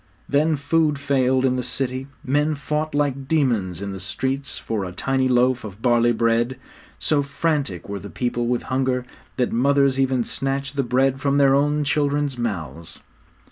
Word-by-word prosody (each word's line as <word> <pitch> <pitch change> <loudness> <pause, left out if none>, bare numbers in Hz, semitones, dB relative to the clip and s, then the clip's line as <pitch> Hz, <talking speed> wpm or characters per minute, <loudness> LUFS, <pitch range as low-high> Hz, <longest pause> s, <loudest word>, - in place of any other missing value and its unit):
Then 155 +3 +2
food 150 +1 +1
failed 130 -2 +2
in 130 -1 +2
the - - 0
city; 130 +1 -3 0.2
men 150 +3 +1
fought 150 +2 -2
like 140 -2 0
demons 115 - 0
in 100 - -4
the 95 - -6
streets 130 +8 -3
for 110 -3 -3
a 90 - -5
tiny 130 +7 0
loaf 125 0 +2
of 105 -2 -8
barley 120 0 +3
bread; 120 +2 +1 0.4
so 150 -2 +1
frantic 140 - -2
were 100 0 -4
the - - -9
people 120 -1 -2
with 120 0 0
hunger 130 -1 -1 0.3
that 125 -2 +1
mothers 140 +2 +3
even 130 -2 +2
snatched 135 +3 -3
the 140 - +2
bread 130 +2 +1
from 140 0 +2
their 135 -1 +5
own 145 +2 +2
children's 145 -1 0
mouths! 85 - -5
130 Hz, 170 wpm, -22 LUFS, 120-140 Hz, 0.4 s, their